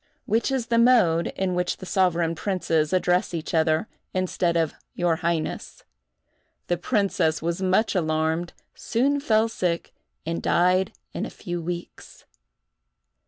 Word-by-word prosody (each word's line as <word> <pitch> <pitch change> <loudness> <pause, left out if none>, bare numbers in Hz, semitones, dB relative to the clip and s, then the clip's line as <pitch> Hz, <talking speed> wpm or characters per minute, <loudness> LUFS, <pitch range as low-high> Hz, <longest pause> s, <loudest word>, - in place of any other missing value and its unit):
which 225 +5 +1
is 260 -3 0
the 230 0 +2
mode 220 -9 +4
in 190 -1 -1
which 180 0 -1
the - - -9
sovereign 175 -3 +1
princes 165 -3 0
address 180 0 +1
each 160 - -5
other, 160 +3 +2 0.3
instead 180 -2 0
of 160 -2 +1 0.2
"your 175 -2 +1
highness." 170 -1 -3 0.8
The 175 - 0
princess 185 -5 +1
was 170 +3 -2
much 190 +4 +2
alarmed, 160 -1 0 0.2
soon 275 +5 0
fell 220 -5 +2
sick, 180 -6 -2 0.3
and 165 +1 -2
died 180 +2 +2 0.2
in - - -3
a - - -3
few 175 -1 -5
weeks. 175 +1 -7
175 Hz, 135 wpm, -25 LUFS, 165-195 Hz, 0.8 s, mode